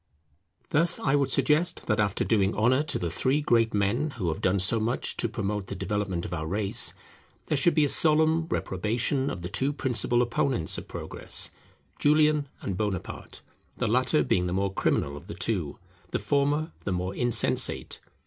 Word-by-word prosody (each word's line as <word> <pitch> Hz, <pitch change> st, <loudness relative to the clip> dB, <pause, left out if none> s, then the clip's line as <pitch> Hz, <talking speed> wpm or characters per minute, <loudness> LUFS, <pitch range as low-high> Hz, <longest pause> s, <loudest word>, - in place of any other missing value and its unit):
Thus 170 Hz, +3 st, +3 dB
I 135 Hz, -, 0 dB
would 140 Hz, -2 st, +2 dB
suggest 165 Hz, +4 st, +1 dB
that 105 Hz, -1 st, 0 dB
after 100 Hz, -2 st, +1 dB
doing 100 Hz, -3 st, +1 dB
honour 125 Hz, +6 st, +3 dB
to 155 Hz, -, -2 dB
the 85 Hz, -2 st, -3 dB
three 130 Hz, -, +1 dB
great 115 Hz, -6 st, +2 dB
men 110 Hz, +9 st, +1 dB
who 90 Hz, -7 st, -1 dB
have 80 Hz, -, -3 dB
done 95 Hz, +1 st, +2 dB
so 95 Hz, +4 st, +2 dB
much 115 Hz, +3 st, -1 dB
to -, -, 0 dB
promote 105 Hz, -3 st, -3 dB
the 100 Hz, -, -5 dB
development 95 Hz, -2 st, -2 dB
of 90 Hz, -, -5 dB
our 80 Hz, -2 st, -3 dB
race, 100 Hz, +3 st, -1 dB, 0.5 s
there 150 Hz, -, 0 dB
should 150 Hz, +5 st, +3 dB
be 155 Hz, -2 st, +4 dB
a -, -, +1 dB
solemn 160 Hz, +2 st, +3 dB
reprobation 120 Hz, -, -1 dB
of 85 Hz, -, -6 dB
the -, -, -3 dB
two 135 Hz, +9 st, 0 dB
principal 120 Hz, -3 st, +1 dB
opponents 120 Hz, -, 0 dB
of -, -, -12 dB
progress, -, -, -4 dB, 0.5 s
Julian 150 Hz, 0 st, +3 dB
and 95 Hz, -, -3 dB
Bonaparte; 100 Hz, -2 st, -4 dB, 0.3 s
the -, -, -1 dB
latter -, -, +2 dB
being 90 Hz, 0 st, +1 dB
the 90 Hz, -, -2 dB
more 95 Hz, +1 st, 0 dB
criminal 70 Hz, -6 st, 0 dB
of 70 Hz, -, -11 dB
the -, -, -7 dB
two, -, -, -1 dB, 0.3 s
the -, -, -1 dB
former 145 Hz, +3 st, 0 dB
the 95 Hz, -, -2 dB
more 90 Hz, +1 st, -2 dB
insensate. 120 Hz, +2 st, +1 dB
115 Hz, 180 wpm, -27 LUFS, 95-145 Hz, 0.5 s, be